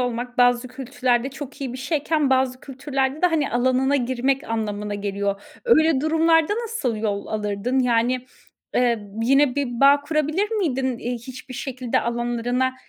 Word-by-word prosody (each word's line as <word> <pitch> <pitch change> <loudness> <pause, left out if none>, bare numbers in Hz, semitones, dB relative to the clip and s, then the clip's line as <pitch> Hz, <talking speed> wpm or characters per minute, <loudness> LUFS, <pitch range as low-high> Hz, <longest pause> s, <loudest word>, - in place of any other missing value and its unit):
olmak 245 0 -3
bazı 245 0 +3
kültürlerde 255 -1 -1
çok 280 +1 -9
iyi 260 -3 -3
bir 255 - -7
şeyken 300 0 0
bazı 260 -1 +1
kültürlerde 270 +2 -3
de, - - +7
hani, 320 -5 0
alanına 260 +3 +2
girmek 260 +2 0
anlamına 210 -2 -3
geliyor. 200 0 -2 0.2
Öyle 320 - +4
durumlarda 325 +3 +3
nasıl 360 - -2
yol 205 -2 -2
alırdın? 215 +4 -2
Yani, 245 +1 +1 0.5
eee, 235 -4 +1
yine 275 +1 +4
bir 255 -4 -2
bağ 280 +1 +6
kurabilir 305 +7 0
miydin, 265 - -1
iii, 245 +1 -3
hiçbir 255 +1 -10
şekilde 255 -2 -2
alanlarına 240 +2 -1
255 Hz, 145 wpm, -23 LUFS, 240-280 Hz, 0.5 s, de